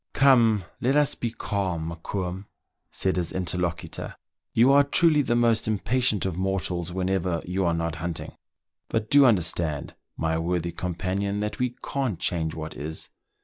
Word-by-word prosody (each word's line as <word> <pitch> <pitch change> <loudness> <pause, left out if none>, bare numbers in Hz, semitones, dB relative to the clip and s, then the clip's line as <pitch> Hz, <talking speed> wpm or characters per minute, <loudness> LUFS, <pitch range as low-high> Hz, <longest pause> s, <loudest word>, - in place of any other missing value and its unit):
" - - -56
Come, 115 -8 +5
let's 140 +3 +2
be 120 - -3
calm, 95 -7 -2
Mokoum," 90 +3 -4 0.4
said 95 -1 -1
his 85 -2 -1
interlocutor. 90 -2 -3 0.4
"You 120 +4 +5
are 140 +1 +7
truly 155 +1 +4
the 120 -4 0
most 115 -2 +3
impatient 110 0 +1
of 95 -3 -1
mortals 90 -2 -1
whenever 90 -2 -1
you 95 +2 -1
are 85 -1 +2
not 85 -1 -2
hunting; 85 0 -4 0.6
but 110 -1 -2
do 140 -1 +8
understand, 85 - 0 0.2
my 80 0 0
worthy 85 0 -1
com 90 +1 -4
panion, 100 +3 -1
that 105 0 -3
we 125 -1 -1
can't 130 -9 -1
change 80 -3 -1
what 80 -2 -6
is. 75 +4 -5
95 Hz, 155 wpm, -26 LUFS, 85-115 Hz, 0.6 s, do